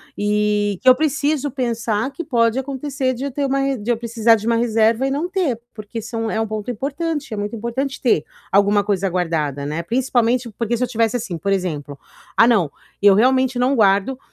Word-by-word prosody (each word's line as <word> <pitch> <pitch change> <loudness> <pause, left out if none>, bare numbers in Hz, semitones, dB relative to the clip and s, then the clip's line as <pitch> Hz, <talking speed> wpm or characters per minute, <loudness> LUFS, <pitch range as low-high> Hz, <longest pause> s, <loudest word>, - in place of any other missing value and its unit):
E 205 -1 0
que 260 - -7
eu 255 - +10
preciso 295 -1 0
pensar 235 -2 -2
que 310 +5 -6
pode 235 -4 +1
acontecer 270 -1 -2
de 260 - -6
eu 280 - -3
ter 280 +2 -1
uma 275 0 0
de 215 +4 -6
eu 230 - +1
precisar 230 -1 +3
de 215 0 -6
uma 230 0 +2
reserva 230 +2 +2
e - - 0
não 295 +6 -1
ter, 350 - -1
porque 215 +1 -7
são 225 0 -3
é 220 - -1
um 225 - +1
ponto 215 +2 -5
importante. 285 +3 -3
É - - -4
muito 205 +2 -3
importante 250 +5 -3
ter 220 - +2 0.3
alguma 200 +1 +4
coisa 195 -2 0
guardada, 155 -6 -1
né. 155 +3 -3
Principalmente, 245 0 0
porque, 235 0 -1
se 250 - -1
eu - - 0
tivesse 230 -1 0
assim, 220 -7 -5
por 195 +5 -2
exemplo: 150 -7 -2 0.4
"Ah, 230 - +7
não, 190 -12 +2 0.3
eu 200 -1 +6
realmente 260 +2 +3
não 255 +3 +2
guardo, 205 +4 +2
230 Hz, 205 wpm, -20 LUFS, 205-265 Hz, 0.4 s, eu